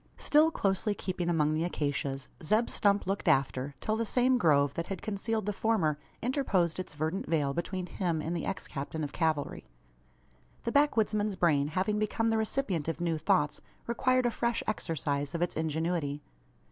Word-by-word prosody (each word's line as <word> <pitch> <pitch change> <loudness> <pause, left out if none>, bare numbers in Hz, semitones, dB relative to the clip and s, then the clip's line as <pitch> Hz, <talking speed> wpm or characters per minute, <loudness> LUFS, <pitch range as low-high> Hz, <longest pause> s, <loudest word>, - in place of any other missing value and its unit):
Still 305 +2 +4
closely 205 - 0
keeping 185 -3 -2
among 155 -3 +2
the 155 +1 0
acacias, 140 -5 -2 0.2
Zeb 215 +9 +2
Stump 200 0 +2
looked 195 +2 -2
after, 135 0 +1
till 215 - 0
the 230 - 0
same 250 +3 +3
grove, 145 - +4
that 170 +2 -3
had 195 -3 -5
concealed 215 +1 -2
the 210 - -1
former, 190 -9 +1 0.2
interposed 200 - +1
its 185 - -6
verdant 160 +6 -2
veil 145 -4 +1
between 180 +2 -3
him 175 -3 -1
and 165 +3 -2
the 170 - -3
ex - - -3
captain 145 +3 -4
of 145 - -4
cavalry. 160 -4 -1 1.0
The 235 - -1
backwoodsman's 215 -8 +2
brain 150 -6 +3
having 190 +7 0
become 225 +1 0
the 225 - +2
recipient 210 - -1
of 165 -1 -2
new 170 -2 0
thoughts, 160 -3 +1 0.2
required 255 +2 +2
a 240 - +2
fresh 235 0 -1
exercise 145 -7 -2
of 170 - +1
its 175 - -1
ingenuity. 160 -2 -1
175 Hz, 170 wpm, -30 LUFS, 155-215 Hz, 1.0 s, Still